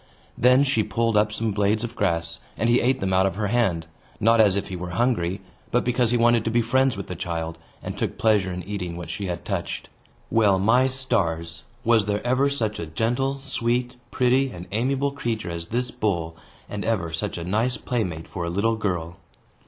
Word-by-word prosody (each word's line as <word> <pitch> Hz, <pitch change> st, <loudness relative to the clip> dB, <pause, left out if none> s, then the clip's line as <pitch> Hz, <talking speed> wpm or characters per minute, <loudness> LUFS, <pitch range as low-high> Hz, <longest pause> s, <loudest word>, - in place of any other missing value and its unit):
Then 125 Hz, +3 st, +5 dB
she 135 Hz, -5 st, +2 dB
pulled 115 Hz, +1 st, 0 dB
up 105 Hz, 0 st, +3 dB
some 110 Hz, +1 st, -1 dB
blades 105 Hz, +2 st, +1 dB
of 120 Hz, 0 st, -5 dB
grass, 85 Hz, -4 st, 0 dB, 0.2 s
and 115 Hz, +1 st, +2 dB
he 120 Hz, -, +4 dB
ate 130 Hz, +2 st, +1 dB
them 95 Hz, -1 st, 0 dB
out 95 Hz, +1 st, +4 dB
of 95 Hz, -, -3 dB
her 105 Hz, 0 st, -1 dB
hand, 95 Hz, -9 st, +1 dB, 0.3 s
not 115 Hz, +1 st, +5 dB
as 100 Hz, -3 st, +4 dB
if 100 Hz, -, -2 dB
he 95 Hz, -, -4 dB
were 90 Hz, 0 st, -5 dB
hungry, 100 Hz, -7 st, +1 dB, 0.3 s
but 125 Hz, -, +2 dB
because 125 Hz, -1 st, +1 dB
he 120 Hz, -, +2 dB
wanted 120 Hz, -1 st, +4 dB
to -, -, +1 dB
be 120 Hz, +1 st, +2 dB
friends 130 Hz, 0 st, +2 dB
with 100 Hz, -, -5 dB
the 90 Hz, -, -6 dB
child, 80 Hz, -1 st, -4 dB, 0.2 s
and -, -, -5 dB
took -, -, -3 dB
pleasure 105 Hz, -4 st, +2 dB
in 90 Hz, 0 st, -5 dB
eating 90 Hz, -4 st, -4 dB
what 85 Hz, -, -6 dB
she 100 Hz, -, -4 dB
had 85 Hz, -2 st, -4 dB
touched. -, -, -3 dB, 0.4 s
Well, 105 Hz, -4 st, +4 dB
my 115 Hz, +7 st, +4 dB
stars! 85 Hz, -11 st, -1 dB, 0.2 s
was 115 Hz, -3 st, +4 dB
there 105 Hz, +2 st, -2 dB
ever 130 Hz, +3 st, +3 dB
such 110 Hz, -7 st, -2 dB
a 85 Hz, -, -4 dB
gentle, 120 Hz, -, 0 dB
sweet, 125 Hz, -1 st, -1 dB
pretty, 130 Hz, +2 st, +2 dB
and 90 Hz, -7 st, -8 dB
amiable 135 Hz, +6 st, 0 dB
creature 115 Hz, -9 st, -3 dB
as 85 Hz, 0 st, -5 dB
this 125 Hz, +1 st, -1 dB
bull, 85 Hz, -6 st, -1 dB, 0.3 s
and 105 Hz, -1 st, -5 dB
ever 95 Hz, -8 st, -1 dB
such 80 Hz, -, -3 dB
a 85 Hz, -, -4 dB
nice 110 Hz, +8 st, 0 dB
playmate 90 Hz, -10 st, -3 dB
for 90 Hz, -, -5 dB
a 85 Hz, -, -2 dB
little 110 Hz, +6 st, +1 dB
girl? 90 Hz, -5 st, -2 dB
110 Hz, 205 wpm, -24 LUFS, 90-120 Hz, 0.4 s, Then